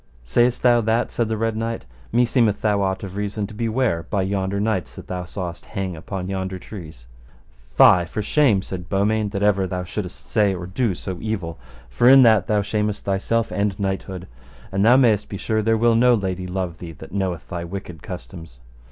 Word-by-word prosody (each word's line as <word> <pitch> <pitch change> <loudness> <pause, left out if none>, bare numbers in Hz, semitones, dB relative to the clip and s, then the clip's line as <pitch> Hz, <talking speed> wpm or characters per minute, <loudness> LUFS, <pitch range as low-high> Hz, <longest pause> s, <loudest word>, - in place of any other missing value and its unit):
Sayst 120 - +2
thou 120 -1 +5
that? 115 +2 0
said 115 - 0
the 110 - -1
Red 115 0 -1
Knight, 115 - -3 0.3
meseemeth 120 -3 +2
thou 105 -2 +2
ought 95 0 -1
of 95 -1 -7
reason 105 +1 -2
to 105 - -10
be 115 +2 -2
ware 110 -8 +1
by 100 -2 0
yonder 95 0 -1
knights 105 -5 -1
that - - -9
thou 90 -1 -4
sawest 90 -2 -6
hang 95 -2 -4
upon 90 +3 -5
yonder 95 -1 -3
trees. 80 - -10 0.7
Fie 90 -1 +7
for 105 +5 -4
shame, 110 -5 +3
said 90 -2 -7
Beaumains, 105 +1 +1
that 100 -1 -2
ever 100 -2 +3
thou 90 0 -3
shouldest 90 0 -6
say 105 -3 +2
or 90 -1 -6
do 95 +2 -1
so 90 0 -6
evil, 95 - -4 0.3
for 65 - +3
in 135 0 +9
that 110 -4 +5
thou 105 -1 +2
shamest 105 0 -2
thyself 105 +4 0
and 100 -1 -1
knighthood, 95 -2 -3 0.4
and 95 +1 +1
thou 120 +4 +7
mayst 115 -6 +3
be 100 - -5
sure 110 +2 0
there 110 +1 +2
will 115 +1 +4
no 120 +2 +5
lady 95 -3 -3
love 90 -2 -3
thee 85 -2 -8
that - - -12
knoweth 95 -3 -2
thy 85 -2 -4
wicked 90 -3 -7
customs. 60 +1 -9
100 Hz, 200 wpm, -22 LUFS, 90-110 Hz, 0.7 s, in